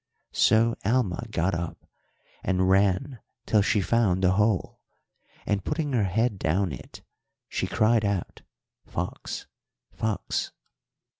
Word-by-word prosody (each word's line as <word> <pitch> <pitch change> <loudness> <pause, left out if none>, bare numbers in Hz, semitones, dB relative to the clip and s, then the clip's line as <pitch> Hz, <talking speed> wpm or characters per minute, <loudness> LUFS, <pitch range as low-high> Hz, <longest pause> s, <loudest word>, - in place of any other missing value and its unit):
So 115 +1 +4
Alma 115 -1 +1
got 95 -2 0
up 85 0 -4 0.6
and 95 0 +1
ran 100 +7 +2 0.3
till 105 - +3
she 100 0 +2
found 95 -3 +2
the 90 - +5
hole, 105 0 +1 0.7
and, 100 -2 0
putting 150 -2 -2
her 110 -5 +2
head 105 +2 0
down 90 +3 +1
it, 70 - -10 0.4
she - - -2
cried 110 0 +3
out, 100 -3 -2 0.4
'Fox! - - -5 0.5
Fox!' 110 -2 -2
100 Hz, 120 wpm, -26 LUFS, 95-115 Hz, 0.7 s, the